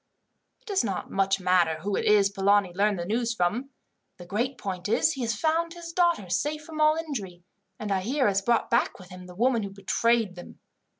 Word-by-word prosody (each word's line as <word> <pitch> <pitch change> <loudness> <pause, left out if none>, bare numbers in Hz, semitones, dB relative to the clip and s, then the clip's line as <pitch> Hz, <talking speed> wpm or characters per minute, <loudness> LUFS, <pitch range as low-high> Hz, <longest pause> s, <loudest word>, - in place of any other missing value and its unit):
"It - - -33
does 400 - 0
not 195 -5 -4
much 195 0 +1
matter 180 -3 +2
who 200 +3 -2
it - - -1
is 205 -1 +4
Polani 200 -1 +2
learned 200 +2 +1
the 170 - -4
news 235 +4 -1
from. 215 +9 -1 0.5
The 175 - -11
great 235 +9 -2
point 185 -1 -5
is, 240 +8 +3
he 270 - -5
has 230 -2 -1
found 330 +2 0
his 340 -1 -8
daughters 335 - +1
safe 300 +5 -3
from 310 0 -6
all 305 0 +5
injury, 215 - -5 0.3
and 210 -1 -5
I 195 - +2
hear 260 +6 +1
has 195 -1 +1
brought 235 +4 +1
back 235 +1 +1
with 185 -1 -14
him 180 0 -10
the 180 - -12
woman 235 +3 +2
who 200 - -4
betrayed 205 +2 0
them. 175 -1 -12
210 Hz, 215 wpm, -26 LUFS, 190-265 Hz, 0.5 s, all